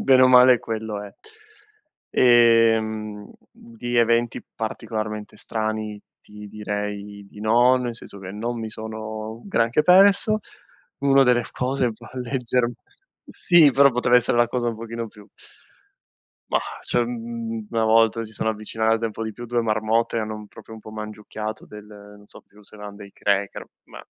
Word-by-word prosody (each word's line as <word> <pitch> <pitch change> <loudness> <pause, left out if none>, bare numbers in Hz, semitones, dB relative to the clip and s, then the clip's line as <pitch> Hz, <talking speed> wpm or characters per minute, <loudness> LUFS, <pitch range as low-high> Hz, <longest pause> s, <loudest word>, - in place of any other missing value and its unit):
bene 130 -1 +5
o 130 - +7
male 125 0 +7
quello 110 -2 -5
è, 105 - -10 1.0
ehm, 110 -3 +3 0.2
di 120 +1 -6
eventi 115 0 +2
particolarmente 110 -1 -5
strani 110 -1 -4 0.2
ti 105 0 -12
direi 105 -1 -5
di 105 - -13
no, 120 +4 +4
nel 125 -2 -3
senso 105 -3 -9
che 95 -1 -8
non 115 +3 -4
mi 110 -1 -5
sono 110 0 -6
granché 125 - +1
perso. 200 +5 +5 0.6
Uno 135 0 +4
delle 125 -1 +3
cose 130 -1 -1
va - - -13
a 130 - -7
leggerm 125 -1 -1 0.7
sì 170 -5 +7
però 140 +1 +5
poteva 125 0 +3
essere 120 0 +2
la 120 - +5
cosa 120 -1 -1
un 115 - -4
pochino 115 0 -6
più 105 -1 -16 1.2
Mah, - - -2
cioè 120 - +1
mhmm, 115 -2 -5
una 115 -1 0
volta 115 +1 +3
si 110 - -9
sono 110 +1 -1
avvicinate 110 +1 -1
un 110 - -6
po' 115 - -6
di 110 - -4
più 120 +3 -9
2 120 0 0
marmotte, 110 +1 0
hanno 110 -1 -3
un 105 0 -9
proprio 110 +2 -13
un 110 - -11
po' 110 - -11
mangiucchiato 110 0 -7
del 105 0 -12
non 105 0 -15
so - - -14
più 105 +1 -21
se 105 - -10
erano 105 -1 -9
dei 100 -1 -12
cracker 100 -1 -1 0.2
ma - - -13
110 Hz, 165 wpm, -23 LUFS, 105-120 Hz, 1.2 s, o